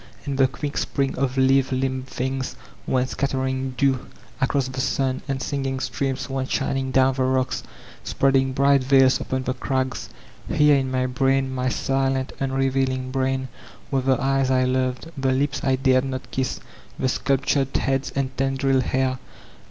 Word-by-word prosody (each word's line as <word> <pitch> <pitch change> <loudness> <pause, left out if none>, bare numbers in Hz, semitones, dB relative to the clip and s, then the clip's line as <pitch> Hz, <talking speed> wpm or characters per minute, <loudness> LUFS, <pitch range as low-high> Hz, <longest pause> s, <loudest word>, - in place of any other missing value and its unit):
And 140 -2 -2
the 135 - +6
quick 145 +2 -5
spring 135 -1 -1
of 135 0 -1
lithe 130 0 +3
limbed 130 0 -1
tfungs 130 +1 -3 0.3
went 130 0 +1
scattering 130 -1 -2
dew 135 -3 +1 0.3
across 135 0 +1
the 130 0 -3
sun; 130 0 0
and 135 -1 -2
singing 135 -1 -2
streams 135 -1 -2
went 135 -1 -3
shining 135 0 -1
down 130 0 +3
the 130 - -3
rocks, 130 0 0 0.4
spreading 135 -1 +2
bright 140 0 +3
veils 135 0 +4
upon 130 0 -2
the 130 - -1
crags. 130 0 -2 0.4
Here 150 -1 +5
in 135 -1 0
my 130 0 0
brain, 135 +1 +1
my 130 0 0
silent 135 0 0
unrevealing 135 -1 0
brain, 130 0 0 0.4
were 135 -1 +2
the 130 -1 +2
eyes 135 0 +1
I 130 -1 +3
loved, 130 +4 -1
the 135 -2 0
lips 140 +2 0
I 135 -1 +3
dared 130 0 +3
not 130 -1 -5
kiss, 130 -1 -2 0.4
the 130 - 0
sculptured 135 +1 +1
heads 135 0 0
and 135 -1 -1
tendriled 135 0 +1
hair. 130 -1 0
130 Hz, 160 wpm, -23 LUFS, 130-135 Hz, 0.4 s, the